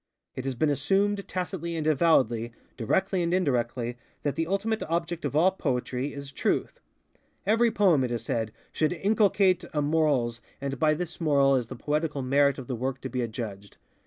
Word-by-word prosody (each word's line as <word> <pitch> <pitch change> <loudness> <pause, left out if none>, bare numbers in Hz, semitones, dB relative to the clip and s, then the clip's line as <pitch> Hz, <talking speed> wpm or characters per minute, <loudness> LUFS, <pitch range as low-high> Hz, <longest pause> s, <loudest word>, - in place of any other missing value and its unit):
_It 130 - -5
has 135 -1 -2
been 150 +5 +2
assumed, 195 +8 +1
tacitly 180 -2 -3
and 160 -2 -2
avowedly, 130 -7 +2 0.2
directly 190 - 0
and 170 0 0
indirectly, 125 -8 0 0.2
that 145 - -1
the 165 0 -1
ultimate 215 +4 -1
object 170 0 -2
of - - -2
all 175 +5 +5
Poetry 130 -5 -2
is 140 -1 -8
Truth. - - -1 0.7
Every 225 +4 +4
poem, 190 - +3
it 125 - -1
is 120 -2 -3
said, 110 -2 -1 0.2
should 155 +2 +1
inculcate 195 -1 +3
a 150 - 0
morals 145 -7 +1 0.2
and 135 -1 -4
by 155 -1 +3
this 175 +1 -6
moral 140 -3 +4
is 125 -3 0
the 125 - -7
poetical 150 +1 -1
merit 140 +1 +3
of 135 - -7
the 125 - -3
work 130 +2 -3
to 130 - -5
be 125 -1 -2
adjudged. 110 -4 -6
145 Hz, 180 wpm, -27 LUFS, 125-175 Hz, 0.7 s, all